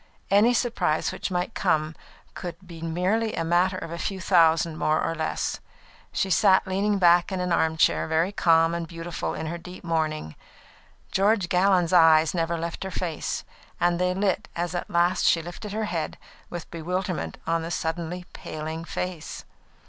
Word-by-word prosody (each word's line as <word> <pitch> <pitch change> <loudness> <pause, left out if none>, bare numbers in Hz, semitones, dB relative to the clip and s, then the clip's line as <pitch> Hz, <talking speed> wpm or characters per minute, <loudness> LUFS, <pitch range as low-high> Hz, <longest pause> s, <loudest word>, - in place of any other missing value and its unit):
Any 215 +5 +5
surprise 195 -10 0
which - - -4
might 180 +3 -2
come 155 -4 +1 0.4
could 175 -3 -6
be 170 -2 -11
merely 185 +7 0
a 165 - -1
matter 175 +3 +2
of 165 - -6
a 170 - -5
few 195 0 -3
thousands 165 -3 +3
more 155 0 +1
or 165 - -1
less. 160 -1 -2 0.5
She 190 - -1
sat 190 +2 +5
leaning 200 +2 0
back 175 0 +4
in 190 - -2
an 180 -1 -1
armchair, 160 -1 +2
very 160 +4 +1
calm 165 -3 +3
and 170 -1 -3
beautiful 165 0 -4
in 160 - -4
her 170 +2 -4
deep 180 +2 -11
mourning. 155 - -1 0.8
George 195 -2 +2
Gallon's 180 -2 +3
eyes 160 -2 +6
never 170 -1 0
left 170 +2 -4
her 190 - -4
face, 170 -3 -3 0.4
and 175 0 +2
they 180 0 +1
lit 195 0 0
as 170 0 -2
at 175 - -4
last 175 +1 +2
she 170 - +5
lifted 175 +5 -8
her 215 +1 -2
head, 165 -6 -3 0.3
with 175 -2 -7
bewilderment 180 +2 -3
on 165 0 0
the 165 - -5
suddenly 170 +2 -3
paling 160 +1 -6
face. 175 -1 -5
175 Hz, 170 wpm, -25 LUFS, 165-185 Hz, 0.8 s, eyes